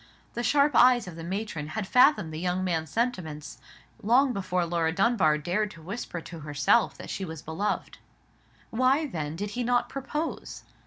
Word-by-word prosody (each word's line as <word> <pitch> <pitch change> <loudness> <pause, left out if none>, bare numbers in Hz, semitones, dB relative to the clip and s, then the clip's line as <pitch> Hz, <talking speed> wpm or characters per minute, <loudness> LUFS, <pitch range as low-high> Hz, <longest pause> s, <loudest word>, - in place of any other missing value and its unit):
The 240 - -3
sharp 280 +4 +3
eyes 245 -3 +5
of 175 - -8
the 165 - -8
matron 180 -4 -4
had 215 - -1
fathomed 210 - +4
the 155 - -4
young 180 +1 -1
man's 165 -4 -1
sentiments 175 - -3 0.4
long 250 +5 +3
before 185 -3 -1
Laura 165 -1 0
Dunbar 195 -5 +3
dared 185 +8 -1
to 165 - -13
whisper 185 -2 -5
to 165 0 -9
herself 150 - +2
that - - -8
she 195 - -4
was 160 -4 -7
beloved. 180 +7 -3 0.7
Why, 255 +6 +2
then, 160 - -4
did 205 +4 -4
he 245 +3 -2
not 245 +1 +1
propose? 275 +4 -5
195 Hz, 170 wpm, -27 LUFS, 160-245 Hz, 0.7 s, eyes